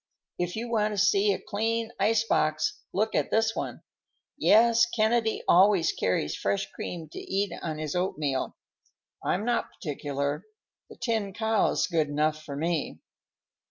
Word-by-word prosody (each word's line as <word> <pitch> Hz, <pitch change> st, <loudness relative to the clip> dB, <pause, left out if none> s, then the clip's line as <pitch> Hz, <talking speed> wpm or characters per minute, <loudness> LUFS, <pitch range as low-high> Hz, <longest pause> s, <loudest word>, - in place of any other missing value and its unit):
"If 175 Hz, 0 st, -2 dB
you 230 Hz, +2 st, -3 dB
want 215 Hz, -2 st, +1 dB
to -, -, -7 dB
see 205 Hz, +1 st, +4 dB
a 190 Hz, -, 0 dB
clean 225 Hz, +2 st, -2 dB
ice 215 Hz, +2 st, +3 dB
box, 155 Hz, -8 st, 0 dB
look 215 Hz, +2 st, 0 dB
at -, -, +1 dB
this 225 Hz, 0 st, +2 dB
one. -, -, -5 dB, 0.5 s
Yes, 235 Hz, +1 st, +5 dB
Kennedy 225 Hz, 0 st, +1 dB
always 185 Hz, -2 st, +5 dB
carries 85 Hz, -5 st, -1 dB
fresh 100 Hz, 0 st, -1 dB
cream 165 Hz, -3 st, -6 dB
to -, -, -8 dB
eat 200 Hz, +1 st, -2 dB
on 155 Hz, -2 st, -3 dB
his 155 Hz, 0 st, -4 dB
oatmeal. 150 Hz, -7 st, -1 dB, 0.7 s
I'm 200 Hz, +4 st, 0 dB
not 240 Hz, 0 st, 0 dB
particular. 145 Hz, -1 st, -3 dB, 0.5 s
The -, -, -11 dB
tin 225 Hz, -5 st, -1 dB
cow's 220 Hz, +1 st, +1 dB
good 160 Hz, -4 st, 0 dB
enough 155 Hz, +1 st, 0 dB
for 140 Hz, -2 st, -7 dB
me." 160 Hz, +1 st, -2 dB
195 Hz, 150 wpm, -27 LUFS, 155-220 Hz, 0.7 s, Yes